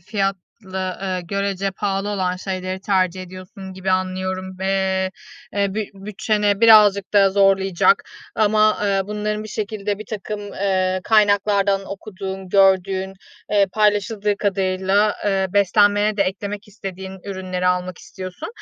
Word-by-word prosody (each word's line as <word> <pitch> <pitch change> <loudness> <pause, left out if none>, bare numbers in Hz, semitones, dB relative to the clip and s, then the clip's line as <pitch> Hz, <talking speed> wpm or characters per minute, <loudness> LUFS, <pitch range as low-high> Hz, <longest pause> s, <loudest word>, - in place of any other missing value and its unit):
fiyatlı, 195 0 -1 0.7
ııı, 185 -1 -2
görece 195 +2 -2
pahalı 195 +1 -2
olan 185 -3 -1
şeyleri 185 0 -4
tercih 185 -2 0
ediyorsun 185 +1 -10
gibi 190 0 -3
anlıyorum 185 0 -2
ve, 190 - -3 0.9
eee, 200 -1 0
büt 215 -2 -2
bütçeni 210 +1 -1
birazcık 210 -4 +6
da 195 -1 +6
zorlayacak 195 - +3 0.3
ama, 215 0 +3
ııı, 195 -1 +1
bunların 210 0 -2
bir 215 - -8
şekilde 205 -1 -3
birtakım, 210 -1 -6
ııı, 190 -2 -1
kaynaklardan 205 -2 +3
okuduğun, 190 -2 -7
gördüğün, 190 0 +3 0.4
eee, 205 -1 +4
paylaşıldığı 210 0 +1
kadarıyla, 195 +1 +1
ııı, 195 -1 +1
beslenmene 205 +1 +3
de 200 - +3
eklemek 200 +2 -4
istediğin 190 -2 -8
ürünleri 185 -1 -3
almak 180 0 0
istiyorsun. 185 - -8
195 Hz, 120 wpm, -21 LUFS, 190-205 Hz, 0.9 s, birazcık